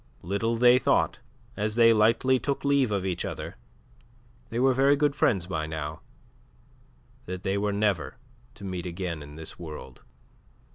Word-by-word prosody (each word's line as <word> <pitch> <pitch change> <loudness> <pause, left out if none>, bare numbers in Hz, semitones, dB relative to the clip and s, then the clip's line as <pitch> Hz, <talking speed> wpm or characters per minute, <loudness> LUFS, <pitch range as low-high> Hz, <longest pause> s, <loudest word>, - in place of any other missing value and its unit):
Little 100 +6 -1
they 125 +2 +6
thought - - +1 0.4
as 105 +1 -2
they 115 -1 +6
lightly 115 +4 +3
took 140 +4 -3
leave 140 -3 +3
of 100 -2 -1
each 90 -2 -2
other - - -5 0.9
they 115 - -4
were 130 +2 +4
very 135 +2 +4
good 145 0 +1
friends 95 - +2
by 80 -4 -3
now 80 -1 -5 1.3
that 90 +1 -5
they 95 0 0
were 105 +1 0
never 100 - 0 0.4
to - - -13
meet 90 -2 -4
again 85 -2 -4
in 75 0 -11
this 80 0 -9
world. 80 -3 -9
100 Hz, 155 wpm, -27 LUFS, 90-120 Hz, 1.3 s, they